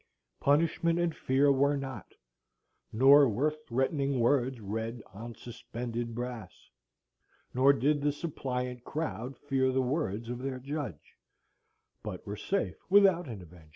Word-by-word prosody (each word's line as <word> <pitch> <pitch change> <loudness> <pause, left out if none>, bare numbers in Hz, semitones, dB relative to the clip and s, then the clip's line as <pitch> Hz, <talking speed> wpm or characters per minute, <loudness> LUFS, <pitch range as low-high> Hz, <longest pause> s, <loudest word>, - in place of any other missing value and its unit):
Punishment 165 +3 +2
and 175 -2 0
fear 140 +2 +3
were 140 +1 +3
not; 135 -5 -7 0.8
nor 135 +4 +7
were 135 +9 +1
threatening 140 -1 -1
words 125 +1 +2
read 110 +2 -4
On 115 +3 -8
suspended 120 -1 -6
brass; 120 -6 -7 0.8
nor 130 +2 +6
did 145 +1 +1
the 145 +1 +2
suppliant 125 -5 -4
crowd 135 -4 -4
fear 135 -2 +1
The 130 0 +1
words 125 - -2
of 120 +1 -4
their 130 0 -3
judge; 135 - -6 0.9
but - - -7
were 100 - -4
safe 195 - -2
without 190 -4 +5
an 105 -7 -7
avenger. 85 -2 -16
130 Hz, 130 wpm, -30 LUFS, 120-145 Hz, 0.9 s, nor